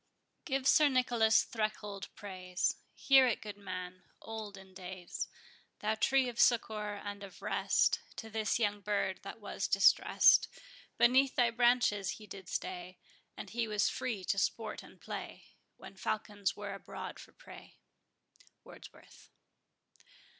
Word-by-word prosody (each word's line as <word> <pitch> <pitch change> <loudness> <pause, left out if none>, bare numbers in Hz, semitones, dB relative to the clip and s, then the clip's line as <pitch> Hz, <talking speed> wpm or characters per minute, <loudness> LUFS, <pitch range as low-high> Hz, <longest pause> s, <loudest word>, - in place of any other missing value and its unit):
Give 270 -4 -1
Sir 300 +1 +6
Nicholas 240 -4 +3
Threlkeld 215 -3 -3
praise; 185 -3 -2 0.2
Hear 270 -1 +6
it, 235 - 0
good 210 -2 -7
man, 185 -2 -7 0.2
old 220 -3 -7
in 190 -1 -14
days, 185 -1 -6 0.5
Thou 215 +1 0
tree 265 +4 +2
of 240 -1 -6
succour 215 -3 +2
and 205 0 -6
of 200 -2 -11
rest - - +2 0.2
To 225 - -7
this 220 -1 0
young 205 -3 0
bird 195 -2 -1
that - - -9
was - - -3
distress'd; - - +5 0.5
Beneath 255 +3 +4
thy 240 -2 +3
branches 240 -4 +2
he 215 - -12
did 195 -3 -10
stay; 180 0 -5 0.4
And - - -8
he 235 -1 -1
was 210 -1 +1
free 225 -7 -3
to 195 +2 0
sport 215 +2 -2
and - - -16
play, - - -7 0.3
When - - -12
falcons 205 -1 -2
were 205 -1 -5
abroad 195 - -8
for - - -13
prey. - - -14 0.9
WORDSWORTH. - - -15
210 Hz, 140 wpm, -33 LUFS, 195-235 Hz, 0.9 s, Sir